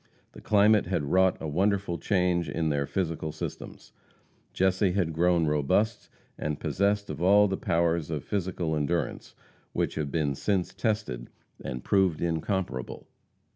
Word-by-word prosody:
The -, -, -13 dB
climate 105 Hz, -1 st, +4 dB
had 75 Hz, -6 st, -1 dB
wrought 95 Hz, 0 st, +4 dB
a 80 Hz, -, -4 dB
wonderful 95 Hz, +2 st, 0 dB
change 90 Hz, -5 st, +1 dB
in 80 Hz, +2 st, -1 dB
their 70 Hz, -1 st, 0 dB
physical 80 Hz, -4 st, -2 dB
systems. 80 Hz, -, -8 dB, 0.6 s
Jesse 95 Hz, 0 st, +2 dB
had 90 Hz, -4 st, 0 dB
grown 85 Hz, 0 st, +3 dB
robust, 75 Hz, +9 st, 0 dB, 0.3 s
and 75 Hz, -1 st, -3 dB
possessed 100 Hz, +1 st, 0 dB
all 100 Hz, +4 st, +4 dB
the 95 Hz, -, -1 dB
powers 85 Hz, -3 st, 0 dB
of 75 Hz, -5 st, -3 dB
physical 90 Hz, -5 st, -2 dB
endurance 75 Hz, +3 st, -2 dB, 0.4 s
which -, -, -1 dB
have 75 Hz, -2 st, -3 dB
been 75 Hz, -2 st, 0 dB
since 95 Hz, +5 st, -1 dB
tested 105 Hz, -, -2 dB, 0.3 s
and 65 Hz, -2 st, -5 dB
proved 95 Hz, -5 st, +2 dB
incomparable. 85 Hz, -, -3 dB
85 Hz, 135 wpm, -28 LUFS, 80-95 Hz, 0.6 s, climate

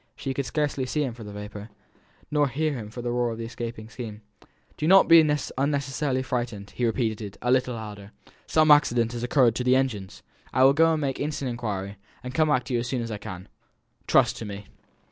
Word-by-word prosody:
She 135 Hz, -, -4 dB
could 135 Hz, -1 st, -3 dB
scarcely 145 Hz, -4 st, -1 dB
see 150 Hz, +4 st, 0 dB
him 130 Hz, -4 st, -3 dB
for 115 Hz, -1 st, -10 dB
the 105 Hz, -, -8 dB
vapour, 105 Hz, +1 st, -8 dB, 0.6 s
nor 150 Hz, -1 st, +3 dB
hear 150 Hz, +4 st, -1 dB
him 110 Hz, -6 st, -6 dB
for 120 Hz, +2 st, -8 dB
the 120 Hz, -, -1 dB
roar 120 Hz, 0 st, +1 dB
of 115 Hz, -, -5 dB
the 115 Hz, -, -5 dB
escaping 115 Hz, -1 st, -6 dB
steam. 110 Hz, -2 st, -8 dB, 0.5 s
"Do 155 Hz, -, -2 dB
not 190 Hz, +2 st, +7 dB
be 165 Hz, 0 st, +9 dB
unnecessarily 140 Hz, -2 st, -1 dB
frightened," 120 Hz, -6 st, -4 dB
he 125 Hz, -, -1 dB
repeated, 110 Hz, -4 st, -2 dB
a 125 Hz, -, 0 dB
little 125 Hz, -1 st, +2 dB
louder. 105 Hz, -2 st, -8 dB, 0.4 s
"Some 155 Hz, -1 st, +4 dB
accident 120 Hz, -6 st, +4 dB
has 120 Hz, -1 st, -5 dB
occurred 120 Hz, -1 st, +3 dB
to 125 Hz, -, -1 dB
the 125 Hz, +1 st, +4 dB
engines. 115 Hz, -8 st, -2 dB, 0.3 s
I 130 Hz, -, +4 dB
will 135 Hz, +1 st, +7 dB
go 165 Hz, +2 st, +4 dB
and 155 Hz, -, -1 dB
make 135 Hz, -2 st, -2 dB
instant 145 Hz, -2 st, -2 dB
inquiry, 100 Hz, -4 st, -4 dB, 0.3 s
and 125 Hz, 0 st, -6 dB
come 155 Hz, +3 st, +3 dB
back 130 Hz, -4 st, +2 dB
to 125 Hz, -, -5 dB
you 120 Hz, -, +2 dB
as 120 Hz, -, -3 dB
soon 125 Hz, -2 st, -2 dB
as 115 Hz, -, -5 dB
I 105 Hz, -, -4 dB
can. 95 Hz, -2 st, -8 dB, 0.6 s
Trust -, -, +4 dB
to 115 Hz, -, -6 dB
me." 100 Hz, 0 st, -7 dB
125 Hz, 220 wpm, -26 LUFS, 110-140 Hz, 0.6 s, be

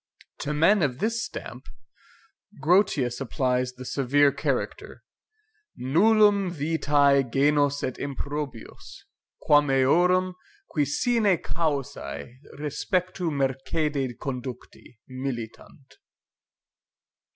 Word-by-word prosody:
To 145 Hz, -, -3 dB
men 165 Hz, +7 st, +4 dB
of 135 Hz, -5 st, 0 dB
this 225 Hz, +6 st, -1 dB
stamp, 125 Hz, +2 st, -8 dB, 0.9 s
Grotius 150 Hz, -, +2 dB
applies 125 Hz, -1 st, -1 dB
the 130 Hz, 0 st, -10 dB
severe 140 Hz, +2 st, +2 dB
character -, -, -3 dB, 0.7 s
NULLUM 200 Hz, -, +3 dB
VITAE 145 Hz, -3 st, +2 dB
GENUS 145 Hz, +1 st, +2 dB
ET 130 Hz, -, -3 dB
IMPROBIUS, 140 Hz, -3 st, -6 dB, 0.4 s
QUAM 145 Hz, -1 st, +4 dB
EORUM, 180 Hz, +8 st, +3 dB, 0.4 s
QUI 150 Hz, -3 st, +1 dB
SINE 210 Hz, -, +2 dB
CAUSAE 125 Hz, -, -3 dB, 0.2 s
RESPECTU 180 Hz, +4 st, -2 dB
MERCEDE 135 Hz, -1 st, -1 dB
CONDUCTI, 125 Hz, -3 st, -7 dB
MILITANT. 130 Hz, +1 st, -7 dB
145 Hz, 85 wpm, -25 LUFS, 130-170 Hz, 0.9 s, men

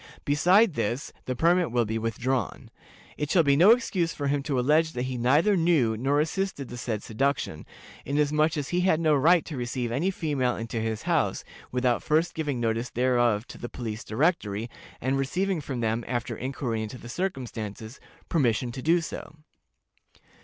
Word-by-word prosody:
Besides 180 Hz, +8 st, +4 dB
this, 125 Hz, +5 st, -2 dB
the 130 Hz, -, -2 dB
permit 170 Hz, +4 st, +3 dB
will 120 Hz, -1 st, +2 dB
be 110 Hz, +1 st, -2 dB
withdrawn. 115 Hz, +1 st, -2 dB, 0.5 s
It 150 Hz, -1 st, -2 dB
shall 170 Hz, -1 st, +4 dB
be 140 Hz, -2 st, +4 dB
no 175 Hz, +8 st, +6 dB
excuse 195 Hz, -8 st, +2 dB
for 145 Hz, -, -4 dB
him 145 Hz, 0 st, +1 dB
to 140 Hz, -2 st, -1 dB
allege 155 Hz, +5 st, +3 dB
that 125 Hz, -, -2 dB
he 130 Hz, 0 st, -3 dB
neither 145 Hz, -, +3 dB
knew 160 Hz, -10 st, +2 dB
nor 135 Hz, +6 st, +1 dB
assisted 160 Hz, -3 st, -2 dB
the 120 Hz, -, -7 dB
said 110 Hz, -3 st, -3 dB
seduction, 115 Hz, -, -2 dB, 0.4 s
inasmuch 150 Hz, +2 st, +1 dB
as 145 Hz, -1 st, -3 dB
he 180 Hz, 0 st, +1 dB
had 180 Hz, -4 st, +3 dB
no 160 Hz, -2 st, +3 dB
right 160 Hz, +4 st, +4 dB
to 155 Hz, -, -6 dB
receive 120 Hz, -1 st, -3 dB
any 150 Hz, +11 st, 0 dB
female 145 Hz, -9 st, -1 dB
into 115 Hz, 0 st, -4 dB
his 110 Hz, -1 st, -3 dB
house -, -, 0 dB, 0.3 s
without 125 Hz, -1 st, +1 dB
first 160 Hz, +3 st, +1 dB
giving 145 Hz, -5 st, -2 dB
notice 115 Hz, +1 st, -1 dB
thereof 120 Hz, -3 st, +1 dB
to -, -, -10 dB
the 120 Hz, -, -6 dB
Police 115 Hz, -3 st, -5 dB
Directory, 115 Hz, -, 0 dB, 0.3 s
and 135 Hz, +2 st, 0 dB
receiving 180 Hz, +6 st, -1 dB
from 130 Hz, -4 st, -4 dB
them, 115 Hz, +1 st, 0 dB
after 120 Hz, -1 st, -2 dB
inquiry 125 Hz, -3 st, -3 dB
into 110 Hz, +3 st, -6 dB
the 120 Hz, -, -11 dB
circumstances, 120 Hz, -, -5 dB, 0.3 s
permission 120 Hz, -6 st, +1 dB
to 130 Hz, -, -7 dB
do 170 Hz, +5 st, +3 dB
so. 155 Hz, -, -7 dB
135 Hz, 175 wpm, -27 LUFS, 120-160 Hz, 0.5 s, no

